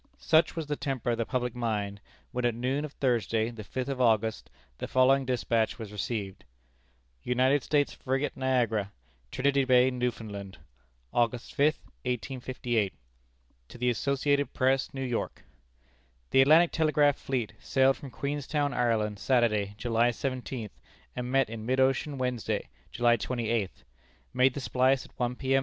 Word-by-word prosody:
Such 160 Hz, 0 st, +3 dB
was 165 Hz, -2 st, -3 dB
the 150 Hz, 0 st, -2 dB
temper 135 Hz, -5 st, -2 dB
of 115 Hz, -, -2 dB
the 115 Hz, -, -1 dB
public 125 Hz, -2 st, -1 dB
mind, 105 Hz, -4 st, -2 dB, 0.3 s
when 125 Hz, -1 st, -3 dB
at 120 Hz, -2 st, +1 dB
noon 130 Hz, +5 st, -1 dB
of 150 Hz, -, -9 dB
Thursday, 115 Hz, -3 st, 0 dB
the 110 Hz, -2 st, -8 dB
fifth 130 Hz, +6 st, -4 dB
of 135 Hz, -2 st, -2 dB
August, 110 Hz, -2 st, +1 dB, 0.3 s
the -, -, -4 dB
following 130 Hz, +1 st, +4 dB
despatch 115 Hz, -2 st, 0 dB
was 110 Hz, -3 st, -7 dB
received: 100 Hz, -, -4 dB, 0.8 s
"United 130 Hz, -, +2 dB
States 145 Hz, +2 st, +1 dB
Frigate 135 Hz, +2 st, -2 dB
Niagara, 120 Hz, -6 st, 0 dB, 0.4 s
Trinity 140 Hz, +1 st, +2 dB
Bay, 130 Hz, 0 st, +4 dB
Newfoundland, 110 Hz, -6 st, -4 dB, 0.6 s
August 120 Hz, 0 st, 0 dB
5, 150 Hz, +2 st, +3 dB, 0.3 s
1858. 125 Hz, -, -2 dB, 0.7 s
"To -, -, -12 dB
the 125 Hz, 0 st, +1 dB
Associated 140 Hz, +4 st, 0 dB
Press, 130 Hz, 0 st, +1 dB
New 135 Hz, -1 st, -4 dB
York: 120 Hz, -2 st, -3 dB, 0.9 s
"The 135 Hz, -, +6 dB
Atlantic 160 Hz, +5 st, +6 dB
Telegraph 150 Hz, -3 st, +3 dB
fleet 125 Hz, -5 st, -2 dB
sailed 135 Hz, 0 st, +3 dB
from 140 Hz, -, -9 dB
Queenstown, 145 Hz, +2 st, -2 dB
Ireland, 110 Hz, -4 st, 0 dB
Saturday, 105 Hz, -6 st, +1 dB
July 115 Hz, +1 st, +2 dB
seventeenth, 125 Hz, -2 st, -4 dB, 0.4 s
and 125 Hz, 0 st, -4 dB
met 135 Hz, -1 st, +3 dB
in 110 Hz, 0 st, -7 dB
mid 130 Hz, +3 st, 0 dB
ocean 135 Hz, +2 st, +1 dB
Wednesday, 125 Hz, -5 st, -2 dB, 0.2 s
July 120 Hz, 0 st, +3 dB
twenty 120 Hz, 0 st, -3 dB
eighth. 95 Hz, -, -2 dB, 0.5 s
Made 130 Hz, 0 st, +3 dB
the 140 Hz, -, -3 dB
splice 130 Hz, +1 st, +2 dB
at -, -, -17 dB
one 125 Hz, 0 st, 0 dB
P.M. 135 Hz, +1 st, +2 dB
125 Hz, 150 wpm, -29 LUFS, 115-135 Hz, 0.9 s, The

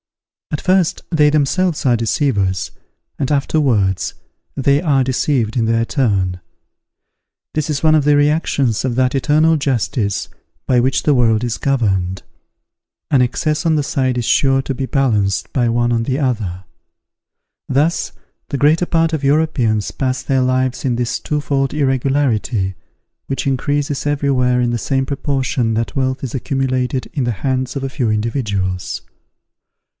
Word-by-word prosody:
At 150 Hz, -, -2 dB
first, 185 Hz, -2 st, +1 dB
they 150 Hz, -3 st, +4 dB
themselves 155 Hz, +3 st, +1 dB
are 125 Hz, -2 st, +4 dB
deceivers: 110 Hz, -5 st, 0 dB, 0.5 s
and 140 Hz, 0 st, -2 dB
afterwards, 130 Hz, -, +1 dB, 0.4 s
they 140 Hz, +1 st, +2 dB
are 140 Hz, -6 st, +2 dB
deceived 125 Hz, -3 st, 0 dB
in 115 Hz, -3 st, +1 dB
their 115 Hz, +1 st, +1 dB
turn. 95 Hz, -, 0 dB, 1.1 s
This 155 Hz, 0 st, -2 dB
is 145 Hz, 0 st, -2 dB
one 155 Hz, 0 st, +5 dB
of 155 Hz, -, +3 dB
the 145 Hz, 0 st, +4 dB
reactions 145 Hz, -5 st, +1 dB
of 130 Hz, -3 st, -1 dB
that 130 Hz, +1 st, +1 dB
eternal 155 Hz, +4 st, +3 dB
justice, 125 Hz, -6 st, -1 dB, 0.4 s
by 125 Hz, -2 st, +3 dB
which 130 Hz, +2 st, +1 dB
the 150 Hz, -, +3 dB
world 115 Hz, -3 st, +2 dB
is 120 Hz, -2 st, -2 dB
governed; 95 Hz, -9 st, 0 dB, 0.9 s
an 135 Hz, -, +4 dB
excess 150 Hz, +6 st, 0 dB
on 160 Hz, -1 st, +3 dB
one 150 Hz, -, +1 dB
side 135 Hz, -4 st, 0 dB
is 120 Hz, -, -1 dB
sure 135 Hz, +2 st, +3 dB
to 135 Hz, -, -3 dB
be 130 Hz, 0 st, -4 dB
balanced 110 Hz, -9 st, 0 dB
by 120 Hz, -3 st, +2 dB
one 120 Hz, +1 st, +1 dB
on 115 Hz, -1 st, +1 dB
the 130 Hz, +3 st, -1 dB
other. 105 Hz, -, -2 dB, 1.1 s
Thus, 150 Hz, +6 st, +1 dB, 0.4 s
the 140 Hz, -, -2 dB
greater 155 Hz, +5 st, +3 dB
part 165 Hz, -1 st, +1 dB
of 155 Hz, -3 st, -2 dB
Europeans 135 Hz, -8 st, +1 dB
pass 130 Hz, -1 st, -2 dB
their 135 Hz, -1 st, +1 dB
lives 130 Hz, 0 st, 0 dB
in 125 Hz, -3 st, 0 dB
this 120 Hz, 0 st, -1 dB
twofold 140 Hz, -2 st, -1 dB
irregularity, 130 Hz, -7 st, 0 dB, 0.5 s
which 135 Hz, 0 st, -2 dB
increases 145 Hz, +2 st, -1 dB
everywhere 135 Hz, -4 st, +1 dB
in 120 Hz, -1 st, +1 dB
the 120 Hz, -, -1 dB
same 135 Hz, +3 st, 0 dB
proportion 130 Hz, -4 st, -1 dB
that 115 Hz, -2 st, -2 dB
wealth 130 Hz, -1 st, -1 dB
is 130 Hz, -, -4 dB
accumulated 130 Hz, -1 st, -1 dB
in 140 Hz, -5 st, -1 dB
the 120 Hz, -, 0 dB
hands 130 Hz, -1 st, -1 dB
of 135 Hz, -, -3 dB
a 135 Hz, -, -2 dB
few 130 Hz, -3 st, -1 dB
individuals. 105 Hz, -5 st, -2 dB
130 Hz, 150 wpm, -18 LUFS, 120-145 Hz, 1.1 s, one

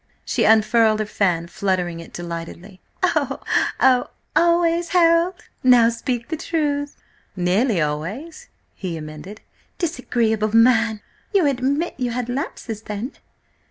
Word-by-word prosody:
She -, -, +1 dB
unfurled 220 Hz, 0 st, +4 dB
her 215 Hz, -, 0 dB
fan, 180 Hz, -5 st, 0 dB
fluttering 180 Hz, -1 st, -2 dB
it 165 Hz, -, -11 dB
delightedly. 170 Hz, +2 st, -8 dB, 0.2 s
"Oh! -, -, +1 dB, 0.4 s
Oh! 255 Hz, -2 st, +4 dB, 0.3 s
Always, 340 Hz, 0 st, +3 dB
Harold? 340 Hz, +1 st, +3 dB, 0.3 s
Now 245 Hz, -2 st, +6 dB
speak 235 Hz, 0 st, -3 dB
the 320 Hz, -, -2 dB
truth!" 295 Hz, -3 st, -2 dB, 0.4 s
"Nearly 190 Hz, +4 st, +1 dB
always," 195 Hz, -, -4 dB, 0.3 s
he 180 Hz, -4 st, -5 dB
amended. 155 Hz, +7 st, -9 dB, 0.4 s
"Disagreeable 230 Hz, -, 0 dB
man! 225 Hz, -2 st, +4 dB, 0.3 s
You 375 Hz, -5 st, +4 dB
admit 280 Hz, +4 st, 0 dB
you 250 Hz, -1 st, 0 dB
had 245 Hz, 0 st, -3 dB
lapses 245 Hz, -4 st, -4 dB
then?" 215 Hz, +5 st, -5 dB
230 Hz, 120 wpm, -21 LUFS, 190-285 Hz, 0.4 s, Now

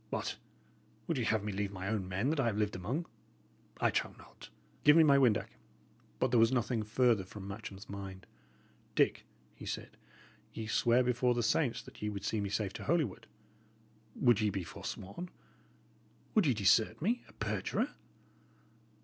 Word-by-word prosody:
What! -, -, -3 dB, 0.7 s
would 160 Hz, -6 st, -1 dB
ye 120 Hz, -, 0 dB
have 110 Hz, -2 st, +1 dB
me 105 Hz, -, -2 dB
leave 100 Hz, 0 st, -2 dB
my 95 Hz, -1 st, -5 dB
own 100 Hz, -3 st, -1 dB
men 100 Hz, +10 st, 0 dB
that 160 Hz, -, -1 dB
I 125 Hz, -, +2 dB
have 105 Hz, -3 st, 0 dB
lived 105 Hz, -1 st, 0 dB
among. 120 Hz, -, -2 dB, 0.7 s
I -, -, +3 dB
trow -, -, -1 dB
not! -, -, -15 dB, 0.3 s
Give 150 Hz, +2 st, +7 dB
me 165 Hz, -, +8 dB
my 140 Hz, -2 st, +6 dB
windac." 120 Hz, -6 st, +3 dB, 0.7 s
But 130 Hz, -, +1 dB
there 120 Hz, -, +5 dB
was 115 Hz, +1 st, +5 dB
nothing 120 Hz, -2 st, +1 dB
further 110 Hz, -1 st, +2 dB
from 95 Hz, +1 st, -9 dB
Matcham's 100 Hz, 0 st, -8 dB
mind. 95 Hz, -2 st, -7 dB, 0.7 s
"Dick," -, -, +2 dB, 0.3 s
he -, -, -10 dB
said, -, -, -5 dB, 0.6 s
"ye 110 Hz, -, -5 dB
sware 120 Hz, +3 st, +3 dB
before 125 Hz, 0 st, +2 dB
the 120 Hz, -, 0 dB
saints 125 Hz, +2 st, +1 dB
that -, -, -14 dB
ye 105 Hz, -, -1 dB
would 100 Hz, -1 st, -5 dB
see 110 Hz, 0 st, 0 dB
me 100 Hz, -, -2 dB
safe 100 Hz, -1 st, -1 dB
to -, -, -7 dB
Holywood. 150 Hz, -, 0 dB, 0.9 s
Would 120 Hz, -4 st, +4 dB
ye 105 Hz, -, +3 dB
be 100 Hz, -2 st, -3 dB
forsworn? 100 Hz, -, -7 dB, 1.0 s
Would 210 Hz, -8 st, +4 dB
you 130 Hz, -, +3 dB
desert 105 Hz, +1 st, +3 dB
me 230 Hz, +9 st, 0 dB
a -, -, -18 dB
perjurer?" -, -, -1 dB
110 Hz, 175 wpm, -33 LUFS, 100-130 Hz, 1.0 s, me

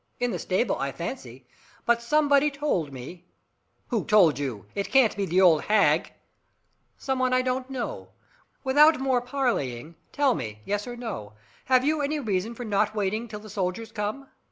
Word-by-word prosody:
In 245 Hz, -1 st, 0 dB
the -, -, -3 dB
stable, 190 Hz, +4 st, 0 dB
I 135 Hz, 0 st, -2 dB
fancy. 135 Hz, -, -7 dB, 0.4 s
But 235 Hz, 0 st, +3 dB
somebody 290 Hz, +3 st, +3 dB
told 280 Hz, -, -2 dB
me 140 Hz, +8 st, -10 dB, 0.3 s
" -, -, -46 dB
"Who 230 Hz, -4 st, 0 dB
told 180 Hz, -9 st, +4 dB
you? 125 Hz, -9 st, -4 dB
It 200 Hz, -, -3 dB
can't 260 Hz, -5 st, +4 dB
be 200 Hz, -1 st, -2 dB
the 180 Hz, +3 st, +3 dB
old 165 Hz, -5 st, +6 dB
hag 210 Hz, -1 st, +3 dB, 0.4 s
" -, -, -46 dB, 0.3 s
"Some 265 Hz, -1 st, -2 dB
one 255 Hz, 0 st, +1 dB
I 255 Hz, 0 st, +3 dB
don't 255 Hz, +1 st, -2 dB
know. 260 Hz, -3 st, -5 dB, 0.5 s
Without 295 Hz, +3 st, +5 dB
more 260 Hz, -2 st, +1 dB
parleying, 200 Hz, -, -2 dB, 0.2 s
tell 285 Hz, -3 st, +2 dB
me, 110 Hz, -, -6 dB
yes 205 Hz, +2 st, -2 dB
or 245 Hz, -, -6 dB
no, 210 Hz, -, -6 dB, 0.3 s
have 255 Hz, 0 st, +3 dB
you 305 Hz, 0 st, +1 dB
any 295 Hz, +2 st, -1 dB
reason 220 Hz, -2 st, -2 dB
for 245 Hz, -, -6 dB
not 215 Hz, 0 st, 0 dB
waiting 215 Hz, +3 st, -1 dB
till 210 Hz, -2 st, -8 dB
the 215 Hz, -, -12 dB
soldiers 200 Hz, +2 st, -3 dB
come? 215 Hz, +6 st, -4 dB
220 Hz, 180 wpm, -26 LUFS, 185-260 Hz, 0.5 s, old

